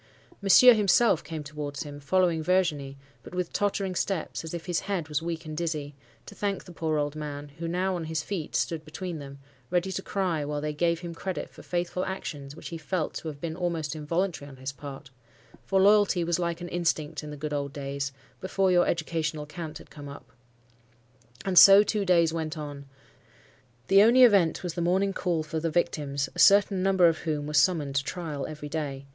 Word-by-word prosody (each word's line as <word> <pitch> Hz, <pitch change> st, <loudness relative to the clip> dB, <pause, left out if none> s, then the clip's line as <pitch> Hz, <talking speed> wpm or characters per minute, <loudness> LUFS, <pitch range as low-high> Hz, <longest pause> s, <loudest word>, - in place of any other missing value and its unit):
Monsieur 240 Hz, +6 st, +8 dB
himself 210 Hz, -3 st, +3 dB
came 160 Hz, -2 st, -6 dB
towards 145 Hz, -1 st, -5 dB
him, 145 Hz, -1 st, -9 dB
following 170 Hz, +2 st, +1 dB
Virginie, 155 Hz, -6 st, 0 dB, 0.2 s
but -, -, -11 dB
with 180 Hz, -1 st, -2 dB
tottering 200 Hz, -2 st, 0 dB
steps, 180 Hz, -2 st, -2 dB
as 160 Hz, -, -7 dB
if 170 Hz, -1 st, -6 dB
his 175 Hz, -3 st, 0 dB
head 190 Hz, -6 st, -3 dB
was 150 Hz, +1 st, -1 dB
weak 165 Hz, 0 st, -4 dB
and 155 Hz, 0 st, -6 dB
dizzy, 155 Hz, -3 st, -3 dB, 0.3 s
to -, -, -10 dB
thank 200 Hz, -2 st, -2 dB
the 180 Hz, -, -12 dB
poor 160 Hz, -2 st, -1 dB
old 145 Hz, 0 st, -1 dB
man, 145 Hz, -1 st, -6 dB
who 170 Hz, -, -3 dB
now 185 Hz, +2 st, 0 dB
on 170 Hz, -2 st, -4 dB
his 155 Hz, -1 st, -2 dB
feet, 175 Hz, -5 st, -5 dB
stood 160 Hz, -2 st, -1 dB
between 165 Hz, +2 st, -6 dB
them, 140 Hz, -1 st, -9 dB, 0.3 s
ready 180 Hz, +2 st, 0 dB
to 190 Hz, -, -3 dB
cry 185 Hz, -6 st, -1 dB
while 145 Hz, 0 st, -3 dB
they 150 Hz, 0 st, -3 dB
gave 170 Hz, +2 st, 0 dB
him 170 Hz, -1 st, -6 dB
credit 185 Hz, +2 st, -5 dB
for -, -, -13 dB
faithful 175 Hz, +1 st, -2 dB
actions 145 Hz, -7 st, -6 dB
which -, -, -9 dB
he 165 Hz, -, -6 dB
felt 160 Hz, +1 st, -2 dB
to -, -, -6 dB
have 150 Hz, -2 st, -6 dB
been 160 Hz, +1 st, -4 dB
almost 165 Hz, -4 st, -2 dB
involuntary 160 Hz, 0 st, -2 dB
on 135 Hz, -, -12 dB
his 130 Hz, +1 st, -5 dB
part,—for 135 Hz, +5 st, -6 dB
loyalty 200 Hz, -2 st, +4 dB
was 170 Hz, +1 st, 0 dB
like 170 Hz, -1 st, -2 dB
an 175 Hz, -, -6 dB
instinct 160 Hz, -3 st, -1 dB
in 150 Hz, -, -7 dB
the 150 Hz, -, -7 dB
good 150 Hz, +1 st, -4 dB
old 140 Hz, -1 st, -2 dB
days, 140 Hz, -1 st, -4 dB, 0.3 s
before 190 Hz, 0 st, +1 dB
your 175 Hz, -1 st, +4 dB
educational 160 Hz, -2 st, -2 dB
cant 155 Hz, 0 st, -7 dB
had -, -, -15 dB
come 145 Hz, -1 st, -9 dB
up. 140 Hz, -3 st, -12 dB, 1.1 s
And 185 Hz, -3 st, +6 dB
so 200 Hz, +1 st, +10 dB
two 210 Hz, -1 st, -1 dB
days 170 Hz, -3 st, +3 dB
went 160 Hz, -1 st, -3 dB
on. 145 Hz, -2 st, -7 dB, 1.0 s
The 195 Hz, +1 st, +6 dB
only 240 Hz, +4 st, +7 dB
event 195 Hz, -10 st, +4 dB
was 175 Hz, -3 st, -3 dB
the 175 Hz, -, -3 dB
morning 190 Hz, +3 st, +1 dB
call 175 Hz, -4 st, -1 dB
for 155 Hz, +1 st, -3 dB
the 165 Hz, +1 st, -1 dB
victims, 145 Hz, -4 st, -1 dB
a -, -, -8 dB
certain 200 Hz, -1 st, +5 dB
number 190 Hz, -1 st, +4 dB
of 165 Hz, -1 st, +1 dB
whom 150 Hz, -3 st, -2 dB
were 150 Hz, -, -5 dB
summoned 150 Hz, -1 st, +3 dB
to 140 Hz, -, +1 dB
trial 155 Hz, -3 st, -4 dB
every 150 Hz, -1 st, -7 dB
day. 140 Hz, -3 st, -4 dB
165 Hz, 205 wpm, -27 LUFS, 150-180 Hz, 1.1 s, so